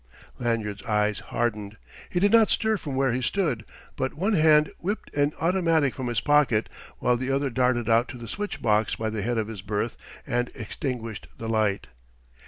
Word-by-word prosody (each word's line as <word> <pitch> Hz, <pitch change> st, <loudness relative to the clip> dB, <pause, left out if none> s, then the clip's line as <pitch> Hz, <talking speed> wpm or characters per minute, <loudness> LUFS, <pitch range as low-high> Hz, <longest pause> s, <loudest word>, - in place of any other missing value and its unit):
Lanyard's 110 Hz, -4 st, -1 dB
eyes 105 Hz, 0 st, +1 dB
hardened. 105 Hz, -3 st, -3 dB, 0.3 s
He 175 Hz, -, 0 dB
did 200 Hz, +2 st, +3 dB
not 225 Hz, -1 st, +6 dB
stir 220 Hz, -1 st, +2 dB
from 145 Hz, -7 st, -5 dB
where 135 Hz, -1 st, +2 dB
he 125 Hz, +2 st, -1 dB
stood, 140 Hz, -, 0 dB, 0.3 s
but 130 Hz, -1 st, -2 dB
one 195 Hz, +8 st, 0 dB
hand 155 Hz, -3 st, +5 dB
whipped 205 Hz, +5 st, -4 dB
an 145 Hz, 0 st, +2 dB
automatic 165 Hz, -5 st, +2 dB
from 130 Hz, -3 st, -4 dB
his 120 Hz, -3 st, 0 dB
pocket 145 Hz, -7 st, +3 dB, 0.3 s
while 125 Hz, 0 st, +2 dB
the 130 Hz, +2 st, -3 dB
other 135 Hz, 0 st, 0 dB
darted 125 Hz, -2 st, +1 dB
out 115 Hz, +1 st, +4 dB
to 125 Hz, -, -8 dB
the 120 Hz, -1 st, -8 dB
switch 205 Hz, -, -4 dB
box 105 Hz, 0 st, +2 dB
by 110 Hz, -1 st, -2 dB
the 110 Hz, -1 st, -3 dB
head 120 Hz, +3 st, -1 dB
of 110 Hz, -2 st, 0 dB
his 110 Hz, -4 st, -7 dB
berth 105 Hz, +3 st, -2 dB, 0.3 s
and 120 Hz, +1 st, 0 dB
extinguished 115 Hz, -2 st, -5 dB
the 115 Hz, -, -6 dB
light. 110 Hz, -3 st, +1 dB
120 Hz, 190 wpm, -26 LUFS, 110-150 Hz, 0.3 s, not